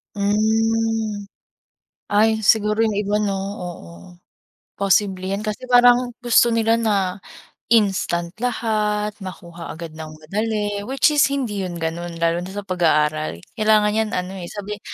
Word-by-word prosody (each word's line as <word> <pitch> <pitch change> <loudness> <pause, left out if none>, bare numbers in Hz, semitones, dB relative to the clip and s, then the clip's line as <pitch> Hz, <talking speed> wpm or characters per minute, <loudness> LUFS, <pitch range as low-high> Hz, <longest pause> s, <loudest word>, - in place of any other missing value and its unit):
Hmm. 220 +1 0 0.9
Ay, 220 +1 +3
siguro 215 +1 +3
yung 220 -3 +1
iba, 210 +1 0
no, 200 -2 0
oo. 180 - -6 0.9
Posible 195 -1 +1
'yan 200 - -2
kasi 215 +3 -4
parang 245 0 +5
gusto 240 -1 +4
nila 225 0 +2
na 200 -5 0 0.5
instant 190 -6 +1
lahat, 215 -3 -1
makuha 170 -2 -9
agad 165 -1 -7
ng 155 0 -8
madali 205 +5 -2
which 275 +3 +3
is 290 -1 +4
hindi 245 -8 -2
'yon 180 -2 -4
gano'n 170 +1 -4
lalo 170 +1 +1
na 180 - -7
sa 205 +1 -6
pag-aaral. 155 - +1 0.2
Kailangan 215 -1 +3
'yan 220 0 0
ano, 180 +1 -3
eh, 170 - -7
sabi, 205 0 -6
205 Hz, 135 wpm, -21 LUFS, 180-220 Hz, 0.9 s, parang